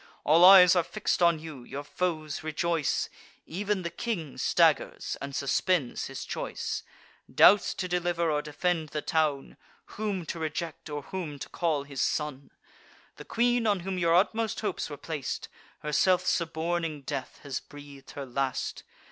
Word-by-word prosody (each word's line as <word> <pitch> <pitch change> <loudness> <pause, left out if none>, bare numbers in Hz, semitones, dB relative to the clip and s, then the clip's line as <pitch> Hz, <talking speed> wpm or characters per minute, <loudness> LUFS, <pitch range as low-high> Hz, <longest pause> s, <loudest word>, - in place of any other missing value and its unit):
All 160 +4 +5
eyes 185 -1 +9
are 175 - +5
fix'd 195 +2 -2
on 170 -1 +5
you: 155 -5 -9
your 140 +3 -6
foes 155 -2 -2
rejoice; 155 0 0 0.4
Ev'n 200 +2 -2
the 170 - -3
king 170 - -4
staggers, - - +2
and 140 0 -5
suspends 140 0 0
his - - -6
choice; - - -4 0.5
Doubts 200 -1 +6
to 185 - -3
deliver 175 -2 0
or 150 -1 +1
defend 160 +1 -1
the 150 0 -4
town, 150 -4 0 0.4
Whom 200 -5 -2
to 165 - -5
reject, 160 +1 -4
or 145 -1 -4
whom 165 -5 -5
to - - -8
call 160 -5 0
his 140 -2 -5
son. 150 -3 -2 0.7
The - - -10
queen, 240 0 +1
on 200 -3 +2
whom 185 +1 -3
your 170 -1 +3
utmost 220 +4 +1
hopes 205 -7 -2
were 145 - -7
plac'd, 155 -4 -5 0.3
Herself 180 +5 +2
suborning 165 -3 -1
death, 135 -1 -5
has 140 -3 -3
breath'd 145 -2 -13
her 140 - -5
last. 130 0 -2
165 Hz, 155 wpm, -28 LUFS, 145-180 Hz, 0.7 s, eyes